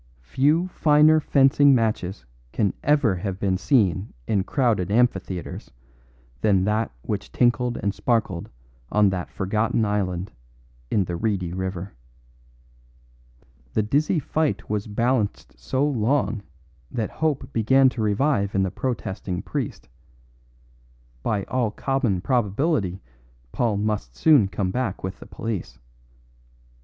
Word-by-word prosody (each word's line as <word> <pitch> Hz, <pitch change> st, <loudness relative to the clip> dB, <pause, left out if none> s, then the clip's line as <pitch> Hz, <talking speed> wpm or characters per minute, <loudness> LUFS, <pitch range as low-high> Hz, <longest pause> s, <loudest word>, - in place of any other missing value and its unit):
Few 145 Hz, -, +2 dB
finer 155 Hz, -1 st, +5 dB
fencing 140 Hz, -1 st, +4 dB
matches 105 Hz, -, -1 dB, 0.3 s
can 100 Hz, -4 st, 0 dB
ever 145 Hz, -10 st, +2 dB
have 95 Hz, +1 st, -4 dB
been 95 Hz, -2 st, +1 dB
seen 100 Hz, -, +1 dB
in 100 Hz, -3 st, +1 dB
crowded 110 Hz, -7 st, +1 dB
amphitheatres 100 Hz, -5 st, -1 dB, 0.7 s
than 95 Hz, -3 st, +3 dB
that 105 Hz, +3 st, 0 dB
which -, -, -4 dB
tinkled 120 Hz, 0 st, +1 dB
and 100 Hz, -1 st, -1 dB
sparkled 105 Hz, -9 st, -1 dB, 0.4 s
on 105 Hz, -2 st, +4 dB
that 90 Hz, -2 st, -4 dB
forgotten 110 Hz, +3 st, 0 dB
island 95 Hz, -3 st, -2 dB, 0.6 s
in 100 Hz, -, +2 dB
the 90 Hz, -, -4 dB
reedy 90 Hz, -3 st, -1 dB
river. 95 Hz, 0 st, -4 dB, 1.8 s
The 110 Hz, -, +2 dB
dizzy 145 Hz, -, +1 dB
fight 155 Hz, +1 st, -1 dB
was 105 Hz, 0 st, -1 dB
balanced 110 Hz, -, -1 dB
so 130 Hz, -, 0 dB
long 115 Hz, -4 st, 0 dB, 0.5 s
that 115 Hz, -4 st, -3 dB
hope 150 Hz, -4 st, -2 dB
began 130 Hz, +4 st, +4 dB
to 125 Hz, -2 st, -5 dB
revive 105 Hz, -1 st, +1 dB
in 95 Hz, -, +3 dB
the 95 Hz, -, -1 dB
protesting 95 Hz, -7 st, -3 dB
priest; -, -, -4 dB, 1.3 s
by 105 Hz, -, -1 dB
all 120 Hz, 0 st, 0 dB
common 120 Hz, -4 st, -1 dB
probability 105 Hz, -, 0 dB, 0.5 s
Paul 115 Hz, -4 st, 0 dB
must 100 Hz, -, -2 dB
soon 145 Hz, -, +5 dB
come 95 Hz, -1 st, -2 dB
back 125 Hz, -4 st, -2 dB
with 95 Hz, 0 st, -5 dB
the -, -, -11 dB
police. 110 Hz, -5 st, -5 dB
105 Hz, 120 wpm, -24 LUFS, 95-130 Hz, 1.8 s, finer